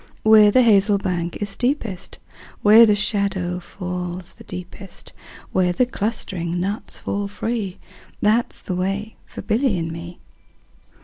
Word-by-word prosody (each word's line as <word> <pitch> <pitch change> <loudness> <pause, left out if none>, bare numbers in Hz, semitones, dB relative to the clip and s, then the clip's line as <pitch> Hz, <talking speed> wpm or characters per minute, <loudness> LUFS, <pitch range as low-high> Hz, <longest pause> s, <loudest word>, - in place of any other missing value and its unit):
Where 220 -1 +7
the 255 +5 +5
hazel 205 -2 +4
bank 175 -3 -3
is 205 - -3
steepest, 230 -4 -3 0.5
Where 220 +2 +8
the 210 - +4
shadow 200 -4 -1
falls 180 0 -6
the - - -15
deepest, 180 +2 -10 0.4
Where 185 -1 +2
the 245 +8 +2
clustering 190 -7 -3
nuts 200 +3 -3
fall 200 0 -3
free, 210 -1 -3 0.4
15 - - -34
That 225 +3 +2
's - - -5
the 185 - -4
way 195 +4 -2
for - - -9
Billy 225 -1 +1
and 165 -1 -3
me. 170 +1 -8
200 Hz, 145 wpm, -21 LUFS, 180-215 Hz, 0.5 s, Where